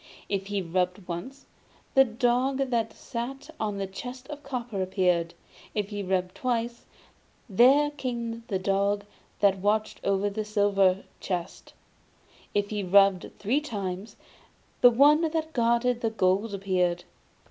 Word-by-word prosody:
If 195 -1 -2
he 200 -1 -2
rubbed 180 +2 -1
once, 180 +11 -6 0.5
the 270 - +7
dog 255 +3 0
that 225 -2 0
sat 270 +5 -6
on 210 -2 -2
the 195 - -2
chest 250 +7 -8
of 295 -1 -7
copper 245 -7 -4
appeared; 180 -3 +1 0.4
if 205 -2 -1
he 205 -1 -4
rubbed 185 -1 -1
twice, 235 -1 -2 0.6
there 265 +8 +5
came 235 -5 -4
the 195 - 0
dog 200 +2 0 0.4
that 195 -2 +4
watched 215 +2 0
over 200 +1 +1
the 210 +2 -2
silver 200 -3 +2 0.2
chest; 175 -2 -5 0.8
and 205 - +3
if 200 - -14
he 210 -1 -1
rubbed 195 0 +4
three 250 +9 +1
times, 200 -6 -5 0.7
the 245 - +9
one 285 +6 +5
that 320 -1 -1
guarded 235 0 +2
the 225 - +1
gold 200 0 +1
appeared. 180 -3 0
210 Hz, 140 wpm, -27 LUFS, 195-245 Hz, 0.8 s, the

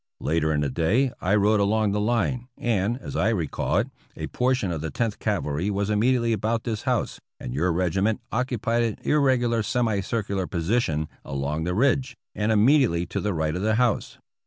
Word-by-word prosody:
Later 80 +1 0
in 75 -1 +1
the 70 - 0
day 110 - +2
I 95 +3 +2
rode 105 +1 +3
along 105 +1 +2
the 105 - 0
hne, 120 +3 0
and, 115 0 0
as - - -8
I 105 - +2
recall 90 -10 -1
it, - - +1 0.3
a - - -3
portion 125 -6 0
of 80 -3 -3
the 80 - -3
Tenth 110 +8 -2
Cavalry 90 -4 -1
was 100 +1 -1
immediately 115 +2 +2
about 110 +2 -1
this 110 -3 -3
house, - - -1 0.2
and - - -6
your 85 +7 +1
regiment 95 +6 +1
occupied 120 -1 0
an 115 -3 -1
irregular 125 -6 +2
semi 110 -2 0
circu 100 0 -2
lar 95 -2 -1
position 85 -3 0 0.2
along 70 +4 -3
the 90 +1 -1
ridge 130 +1 +1 0.2
and 105 +1 0
immediately 110 - +4
to - - -3
the 105 - -1
right 80 0 -1
of 90 - -3
the 110 +1 +2
house. 120 -2 0
105 Hz, 190 wpm, -25 LUFS, 90-120 Hz, 0.3 s, immediately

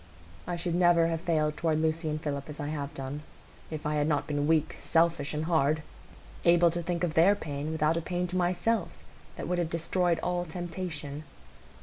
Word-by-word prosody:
I 175 - -1
should 170 0 -2
never 175 -1 +5
have 165 -1 -2
failed 155 -3 +1
toward 160 -1 +1
Lucy 160 0 0
and 155 0 -2
Philip 145 -2 -4
as 150 - -8
I 145 -1 -3
have 145 -2 -3
done, 135 +2 -5 0.5
if 155 -2 -6
I 150 0 0
had 145 0 +2
not 145 -2 +1
been 145 -1 -1
weak, 160 -1 +2
selfish, 165 -3 +2
and 155 +1 -2
hard,—able 165 +2 +1
to 175 +1 -2
think 170 0 -2
of 170 -3 0
their 180 +6 +6
pain 145 -3 -4
without 160 +1 +2
a - - 0
pain 180 +2 -2
to 180 - -4
myself 185 +3 +1 0.5
that - - -5
would 180 0 0
have 170 -2 0
destroyed 170 +1 +1
all 175 0 0
temptation. 165 -4 -5
160 Hz, 195 wpm, -29 LUFS, 150-175 Hz, 0.5 s, their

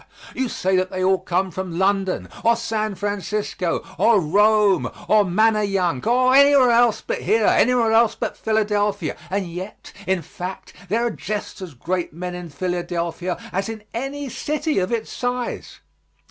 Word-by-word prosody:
You 260 -2 -2
say 190 -2 0
that 185 0 0
they 185 -1 -3
all 190 0 +3
come 185 +1 -1
from 180 -1 -5
London, 190 0 0 0.2
or 230 0 +4
San 215 -2 -2
Francisco, 205 -3 -2
or 230 -3 +5
Rome, 205 +4 +3 0.2
or 215 -1 +5
Manayunk, 195 - +1
or 255 +2 +4
anywhere 280 -2 +6
else 235 -1 +3
but - - -3
here 220 -1 +2
anywhere 235 -1 +3
else 225 0 +4
but - - -3
Philadelphia 210 -4 0
and 195 0 -1
yet, 180 +4 -8
in 190 -3 0
fact, 180 +5 -8 0.2
there 230 +4 +1
are 240 - 0
just 210 -1 -5
as 175 -7 -8
great 175 +6 -3
men 180 +2 -5
in 175 -1 -7
Philadelphia 175 +2 -3
as 195 +3 -2
in 220 -2 -7
any 275 +4 -4
city 300 +2 -1
of 185 +3 -2
its 230 -2 -3
size. 245 0 -4
205 Hz, 160 wpm, -22 LUFS, 185-225 Hz, 0.2 s, anywhere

